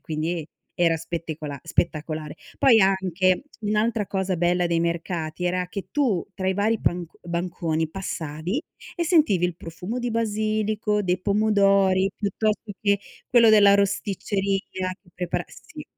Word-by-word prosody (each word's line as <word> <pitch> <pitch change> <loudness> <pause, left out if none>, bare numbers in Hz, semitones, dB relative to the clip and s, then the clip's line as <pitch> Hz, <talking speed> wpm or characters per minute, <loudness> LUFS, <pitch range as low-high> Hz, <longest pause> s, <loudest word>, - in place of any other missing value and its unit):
quindi 160 +1 -3 0.3
era 170 -2 +3
spettecola 160 -3 -5
spettacolare. 155 -2 -2 0.2
Poi 235 -5 +6
anche 190 -1 +2 0.2
un'altra 215 0 0
cosa 190 -1 -1
bella 175 +1 +2
dei 170 -1 +1
mercati 170 0 -2
era 180 0 0
che 195 +1 -6
tu, 250 - +1
tra 190 -1 -2
i 190 - +1
vari 215 +3 +1
panc 175 -1 -2
banconi, 170 -2 -2
passavi 175 - -4 0.3
e 340 - 0
sentivi 300 - +3
il 175 -2 -1
profumo 180 +8 -6
di 245 -1 -2
basilico, 215 -1 0
dei 180 -1 0
pomodori, 200 -2 +3
piuttosto 210 +1 -1
che 200 -1 +2 0.3
quello 230 -2 +6
della 205 -2 +7
rosticceria 195 -1 -1
che 180 - -23
prepara 180 -1 -2
sì. - - -11
190 Hz, 135 wpm, -24 LUFS, 170-210 Hz, 0.3 s, della